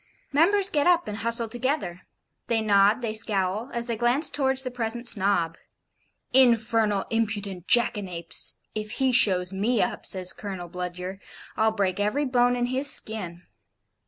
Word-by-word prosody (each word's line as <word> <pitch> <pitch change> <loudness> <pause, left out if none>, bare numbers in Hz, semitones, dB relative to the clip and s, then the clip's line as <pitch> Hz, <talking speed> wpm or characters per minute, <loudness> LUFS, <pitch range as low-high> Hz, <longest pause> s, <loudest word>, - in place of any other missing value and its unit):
Members 390 +7 +3
get 295 -2 +1
up 345 -1 +3
and 210 0 -5
hustle 230 +1 -1
together; 240 - -3 0.5
they 230 -1 +1
nod, 210 +2 +3
they 220 -2 -2
scowl, 215 +1 -1
as 235 0 -2
they 235 -1 -3
glance 240 +7 +1
towards 265 -2 0
the 255 - -5
present 240 0 -3
Snob. 190 -7 +3 0.7
'Infernal 225 -5 +3
impudent 205 -5 -3
jackanapes! 190 -8 0 0.2
If 215 -1 -5
he 265 -1 +1
shows 185 -6 +3
me 215 +5 0
up,' - - -2
says 185 -1 -1
Colonel 190 -4 -7
Bludyer, 180 +2 -6 0.4
'I'll 220 0 +2
break 195 -2 -1
every 210 +9 0
bone 245 -1 +2
in 245 0 -1
his 265 +3 +3
skin.' 180 -5 -2
220 Hz, 150 wpm, -25 LUFS, 195-245 Hz, 0.7 s, Members